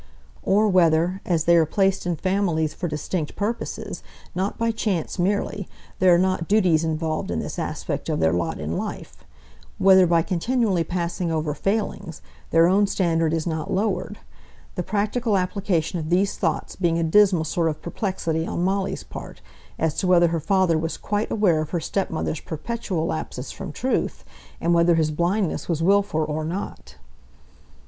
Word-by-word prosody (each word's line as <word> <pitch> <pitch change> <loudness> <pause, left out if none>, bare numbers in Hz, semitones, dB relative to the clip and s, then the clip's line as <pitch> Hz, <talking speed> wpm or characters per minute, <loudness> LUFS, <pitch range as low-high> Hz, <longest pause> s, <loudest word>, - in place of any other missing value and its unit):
Or 210 +3 +3
whether, 175 0 +3
as 165 -4 +2
they 170 +1 +5
are 165 -1 +5
placed 195 +1 +1
in 175 - 0
families 175 -4 0
for 180 - -4
distinct 155 +1 -3
purposes, 220 +3 -4 0.3
not 190 +3 -2
by 230 0 +1
chance 200 -6 -2
merely, 200 +1 -1 0.3
there 185 -1 +5
are - - +4
not 185 -2 0
duties 185 -7 +3
involved 160 0 -2
in - - -1
this - - -5
aspect - - -4
of - - 0
their 80 0 +3
lot 85 -2 -1
in 75 +2 -3
life, - - -6 0.5
whether 190 -1 +6
by 165 -1 +3
continually 195 0 +1
passing 175 0 -2
over 155 -2 -1
failings, 195 -3 -3 0.3
their 165 0 +5
own 200 +3 +4
standard 165 -5 +1
is 160 -1 -1
not 160 +2 -3
lowered, 195 0 -1 0.6
the 180 - -2
practical 210 +3 0
application 180 -3 -1
of 155 -1 -5
these 190 +3 +2
thoughts 165 -5 -2
being 170 -3 +1
a 170 - +1
dismal 185 0 +4
sort 165 +1 0
of 155 - -4
perplexity 170 -3 -2
on 170 - -2
Molly's 195 +1 -1
part - - -9 0.4
as 160 -2 0
to 190 - 0
whether 175 -2 +5
her 165 0 -1
father 185 -1 +2
was 160 +1 -3
quite 205 +1 -2
aware 180 -8 +2
of 155 - -4
her 175 - -1
stepmother's 165 -2 -2
perpetual 175 0 -3
lapses 80 - -4
from - - -7
truth; - - -2 0.3
and 170 - +1
whether 170 0 +4
his 155 -1 +1
blindness 175 +5 -1
was 165 -1 0
wilful 195 -4 +2
or 155 +1 -2
not. 175 +6 -6
175 Hz, 170 wpm, -23 LUFS, 160-195 Hz, 0.6 s, whether